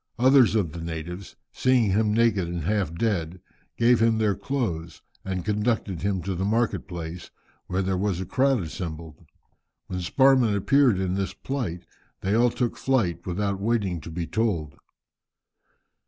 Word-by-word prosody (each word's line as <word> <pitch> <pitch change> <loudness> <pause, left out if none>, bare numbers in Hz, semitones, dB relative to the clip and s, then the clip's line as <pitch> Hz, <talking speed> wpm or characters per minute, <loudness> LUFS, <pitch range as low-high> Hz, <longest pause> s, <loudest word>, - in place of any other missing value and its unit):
Others 130 -2 +5
of 95 -8 +1
the 85 - -7
natives, 85 +3 -6 0.2
seeing 125 -5 +2
him 105 +2 +2
naked 105 -5 +2
and 85 -1 -4
half 100 -2 0
dead, 90 -4 -1 0.4
gave 120 0 +4
him 115 -1 +3
their 110 -2 +2
clothes, 90 - -3 0.2
and 95 -2 -4
conducted 105 -4 -1
him 95 -2 -1
to 95 +2 -2
the 90 +1 -3
market 110 +3 0
place, 85 -2 -7 0.4
where 95 +2 -1
there 95 0 -1
was 100 -3 0
a 95 - -3
crowd 130 +2 +2
assembled. 80 -1 -7 0.6
When 90 - -4
Sparrman 130 +3 +3
appeared 130 +2 +3
in 95 -1 -1
this 95 0 -2
plight, 110 -11 -4 0.4
they 95 +2 0
all 120 +2 +4
took 120 0 -2
flight, 95 -11 0
without 100 +2 -1
waiting 100 -6 0
to 80 - -9
be 85 +1 -4
told. 85 -5 -1
100 Hz, 155 wpm, -25 LUFS, 85-115 Hz, 0.6 s, Others